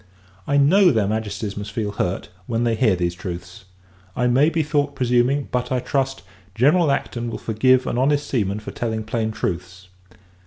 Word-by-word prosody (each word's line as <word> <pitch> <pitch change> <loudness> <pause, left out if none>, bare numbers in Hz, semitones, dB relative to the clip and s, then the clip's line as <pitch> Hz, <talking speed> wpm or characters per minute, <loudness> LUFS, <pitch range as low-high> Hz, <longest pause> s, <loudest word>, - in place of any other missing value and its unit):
I 140 - +2
know, 180 +7 +5
their 110 -8 +2
Majesties 105 -1 -3
must 105 +1 -6
feel 105 -1 -2
hurt, 95 -2 -2 0.2
when 115 0 0
they 120 -1 +2
hear 110 -3 +3
these 85 -1 -1
truths. 90 +1 -8 0.5
I 125 - 0
may 130 +5 +4
be 165 -1 0
thought 145 -1 0
presuming; 125 +3 +1
but, 125 0 -2
I 130 - +1
trust, 135 0 -2 0.3
General 150 +7 +4
Acton 120 -3 -2
will - - -4
forgive 130 +4 +2
an 120 - -1
honest 145 +2 +2
seaman 105 -5 -1
for - - -7
telling 110 -2 -3
plain 110 0 -2
truths. 90 -3 -5
120 Hz, 180 wpm, -22 LUFS, 105-135 Hz, 0.5 s, know